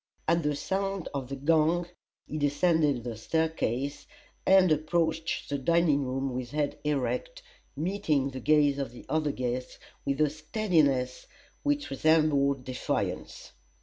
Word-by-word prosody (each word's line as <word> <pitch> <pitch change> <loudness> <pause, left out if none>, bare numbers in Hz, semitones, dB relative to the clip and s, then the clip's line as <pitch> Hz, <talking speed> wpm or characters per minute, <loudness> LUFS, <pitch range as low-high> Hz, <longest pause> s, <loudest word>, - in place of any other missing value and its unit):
At 170 +1 +3
the 150 -1 0
sound 195 +4 -2
of 135 -2 -4
the 140 - -3
gong 160 +4 +2 0.4
he 155 - -5
descended 145 -2 +2
the 120 -2 -4
staircase, 145 0 -1 0.4
and 190 -2 +6
approached 160 +1 0
the 140 -1 -2
dining 155 -1 +3
room 135 +1 -2
with 125 -1 -4
head 145 +1 -2
erect, 150 - -2 0.3
meeting 150 -4 0
the 130 - -6
gaze 145 +1 +3
of 135 -4 -3
the 125 - -12
other 155 -2 0
guests 125 -1 -3 0.3
with 140 +1 -1
a 150 -2 +3
steadiness 155 - 0 0.3
which 290 -1 -1
resembled 140 -2 +3
defiance. 130 -1 -3
150 Hz, 135 wpm, -29 LUFS, 135-165 Hz, 0.4 s, and